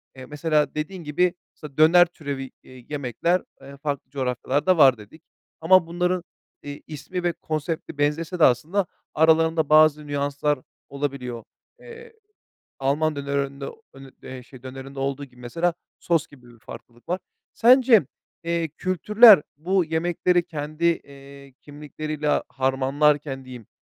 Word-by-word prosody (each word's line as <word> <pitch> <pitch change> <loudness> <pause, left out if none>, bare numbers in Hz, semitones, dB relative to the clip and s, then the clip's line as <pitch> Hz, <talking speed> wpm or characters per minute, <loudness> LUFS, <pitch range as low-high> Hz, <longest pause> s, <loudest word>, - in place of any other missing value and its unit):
eee, 130 -1 -10
mesela 150 0 0
dediğin 165 +4 -5
gibi, 170 +4 +1 0.2
mesela 150 -3 -12
döner 170 +3 +7
türevi, 140 -6 -7
eee, 130 -2 -15
yemekler, 150 +5 -1 0.2
eee, 140 +1 -12
farklı 140 -2 -4
coğrafyalarda 140 +6 0
var 135 -5 +6
dedik 110 +9 -15 0.4
ama 175 +1 +5
bunların, 180 +1 -1 0.4
iii, 145 0 -8
ismi 175 +4 -6
ve 175 -1 0
konsepti 155 -1 -5
benzese 155 +5 -1
de - - +4
aslında 160 +11 +2 0.3
aralarında 160 0 +3
bazı 155 -1 +5
nüanslar 145 0 -1 0.3
olabiliyor. 135 -4 -5 0.4
Eee, 465 -1 -13 0.7
Alman 145 +3 0
dönerinde, 140 0 -3 0.3
hani, 135 0 -13
eee, 130 -1 -9
şey, 130 0 -16
dönerinde 135 +1 -9
olduğu 140 +1 -3
gibi 125 -2 -22
mesela 165 +8 -1 0.3
sos 165 -2 0
gibi 125 -4 -18
bir 120 - -20
farklılık 120 +4 -13
var. 180 +2 -1 0.3
Sence, 240 - +5 0.4
eee, 170 -1 -1
kültürler, 205 +2 +6 0.2
bu 180 +4 +1
yemekleri 175 +2 +1
kendi, 155 0 -5
eee, 140 -4 -4
kimlikleriyle 150 +1 -3
harmanlarken 135 +1 0
diyeyim, 125 -4 -11
150 Hz, 130 wpm, -23 LUFS, 135-170 Hz, 0.7 s, döner